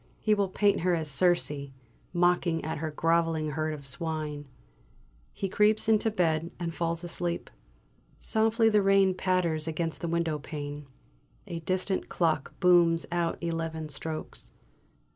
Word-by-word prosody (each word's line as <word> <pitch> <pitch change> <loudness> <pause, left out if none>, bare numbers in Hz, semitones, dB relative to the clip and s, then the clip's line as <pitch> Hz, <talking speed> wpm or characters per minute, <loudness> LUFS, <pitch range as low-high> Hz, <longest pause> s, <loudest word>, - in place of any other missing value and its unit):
He 215 - +2
will 200 -2 +1
paint 200 +2 +2
her 180 +1 +2
as 160 -2 -2
Circe, 175 +3 +2 0.6
mocking 175 -2 +2
at 160 -1 -3
her 160 0 -2
grovelling 165 0 +1
herd 155 +1 -1
of 140 -2 -12
swine! 150 0 -4 0.8
He 195 - -3
creeps 210 +3 +3
into 220 0 +3
bed 170 -5 0
and 170 -1 -3
falls 170 0 -2
asleep. 175 0 -3 0.7
Softly 225 +1 +2
the 210 -2 +4
rain 195 -1 +4
patters 180 -4 0
against 165 0 -3
the 170 - -2
window 165 -2 0
pane. 145 -1 -6 0.6
A 170 - -5
distant 185 +3 -1
clock 160 -5 -1
booms 175 -2 +4
out 170 -1 0
eleven 165 -2 -3
strokes. 155 +2 -6
170 Hz, 140 wpm, -28 LUFS, 160-185 Hz, 0.8 s, the